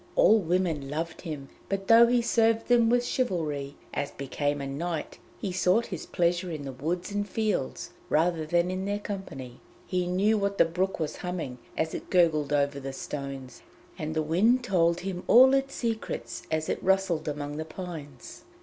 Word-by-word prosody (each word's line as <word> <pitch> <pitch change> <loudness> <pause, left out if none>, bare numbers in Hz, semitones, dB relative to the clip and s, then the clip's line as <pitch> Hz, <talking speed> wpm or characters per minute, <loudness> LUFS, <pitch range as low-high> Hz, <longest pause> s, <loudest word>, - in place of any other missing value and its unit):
All 360 - +6
women 170 -6 0
loved 160 +3 -4
him, 150 -6 -6 0.2
but 195 0 -2
though 230 +1 +8
he 240 0 +2
served 225 0 +2
them 235 -2 +5
with 245 +1 +3
chivalry, 150 - -1 0.2
as 145 - -2
became 145 +2 -2
a 140 - -4
knight, 155 +4 -4 0.2
he 195 - -3
sought 185 +5 +2
his 175 - -6
pleasure 175 +1 +1
in 155 -3 -5
the 135 - -5
woods 170 +9 -3
and 205 0 -2
fields 210 -10 -2 0.2
rather 165 +1 +2
than 175 +3 +1
in 185 +1 -3
their 205 +1 -1
company. 180 -12 -7 0.3
He 180 -1 -1
knew 200 +4 +2
what 200 0 -1
the - - +6
brook 180 +4 -1
was 155 -2 -3
humming 165 -9 -4 0.2
as 160 0 0
it - - -6
gurgled 160 -5 +3
over 140 -1 +1
the 135 0 -6
stones, 135 -2 -6 0.3
and 155 +1 -4
the 155 - +1
wind 215 +11 +3
told 170 -5 +2
him 185 -1 -4
all 260 +3 +8
its 275 0 +1
secrets 230 -2 -3
as 155 0 -1
it - - -2
rustled 190 -5 +1
among 145 0 -4
the 155 - -2
pines. 155 -6 -8
175 Hz, 180 wpm, -28 LUFS, 150-200 Hz, 0.3 s, though